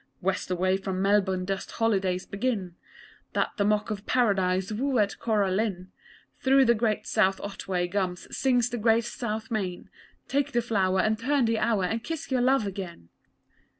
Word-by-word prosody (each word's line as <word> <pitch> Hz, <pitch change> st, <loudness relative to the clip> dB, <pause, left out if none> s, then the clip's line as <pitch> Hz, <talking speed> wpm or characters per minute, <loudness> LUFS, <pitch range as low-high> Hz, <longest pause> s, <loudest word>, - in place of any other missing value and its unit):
West 190 Hz, 0 st, -1 dB
away 185 Hz, +1 st, +1 dB
from 190 Hz, -1 st, -4 dB
Melbourne 190 Hz, -2 st, +2 dB
dust 195 Hz, 0 st, -4 dB
holidays 195 Hz, -5 st, 0 dB
begin 200 Hz, -4 st, -2 dB, 0.6 s
They -, -, +3 dB
that 200 Hz, -, +1 dB
mock 210 Hz, +1 st, +1 dB
at 205 Hz, -1 st, -5 dB
Paradise 190 Hz, -5 st, +1 dB
woo 260 Hz, +5 st, 0 dB
at 205 Hz, -2 st, +1 dB
Cora 210 Hz, -4 st, +1 dB
Lynn 190 Hz, -2 st, -2 dB, 0.5 s
Through 270 Hz, 0 st, +4 dB
the 235 Hz, -, +5 dB
great 220 Hz, -2 st, 0 dB
South 190 Hz, 0 st, +2 dB
Otway 190 Hz, -3 st, -3 dB
gums 180 Hz, -1 st, -2 dB
sings 245 Hz, -3 st, +2 dB
the 240 Hz, -, -3 dB
great 225 Hz, +1 st, +3 dB
South 225 Hz, -3 st, -4 dB
Main 190 Hz, -5 st, -3 dB, 0.4 s
Take 285 Hz, +1 st, 0 dB
the 240 Hz, -, +2 dB
flower 190 Hz, -5 st, +1 dB
and 215 Hz, +1 st, +1 dB
turn 270 Hz, +1 st, +2 dB
the 225 Hz, -1 st, +1 dB
hour, 215 Hz, -4 st, +1 dB
and 225 Hz, +5 st, -1 dB
kiss 325 Hz, 0 st, -5 dB
your 255 Hz, -1 st, +2 dB
love 260 Hz, -2 st, +3 dB
again! 185 Hz, -, -7 dB
210 Hz, 170 wpm, -27 LUFS, 190-235 Hz, 0.6 s, the